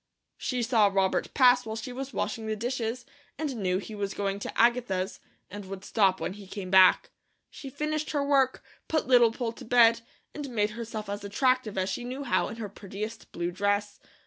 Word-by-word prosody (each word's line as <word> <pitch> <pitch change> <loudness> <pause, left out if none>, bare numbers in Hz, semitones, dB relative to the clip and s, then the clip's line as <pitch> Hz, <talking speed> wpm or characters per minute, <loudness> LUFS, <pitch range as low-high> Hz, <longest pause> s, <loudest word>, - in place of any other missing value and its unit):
She 250 -2 -1
saw 225 -3 +4
Robert 195 -1 0
pass 250 -1 +6
while 220 -1 -5
she 225 +3 -6
was 270 +1 -5
washing 220 0 -3
the 215 - -1
dishes, 240 +1 -3 0.3
and 285 -4 -3
knew 185 -3 0
he 205 +3 -7
was 200 -2 -3
going 200 -1 -2
to - - -5
Agatha's, 230 -6 +1 0.3
and 205 +1 -7
would 195 0 -8
stop 195 -4 +2
when - - -3
he 200 -1 -12
came 190 -2 -6
back. 190 -1 +6 0.4
She 275 - -9
finished 305 +2 -2
her 285 -2 0
work, 270 -2 +2 0.2
put 315 -1 0
Little 245 -3 +5
Poll 235 0 -3
to - - -12
bed, 230 -1 +5 0.3
and 290 -2 -6
made 215 -3 0
herself 220 -1 -6
as 205 0 -5
attractive 245 +1 +1
as 190 0 0
she 240 - -3
knew 255 +3 -5
how 260 - +1
in - - -7
her 225 -2 -5
prettiest 205 +3 -7
blue 175 +1 -3
dress. 205 +2 -1
225 Hz, 200 wpm, -28 LUFS, 200-250 Hz, 0.4 s, pass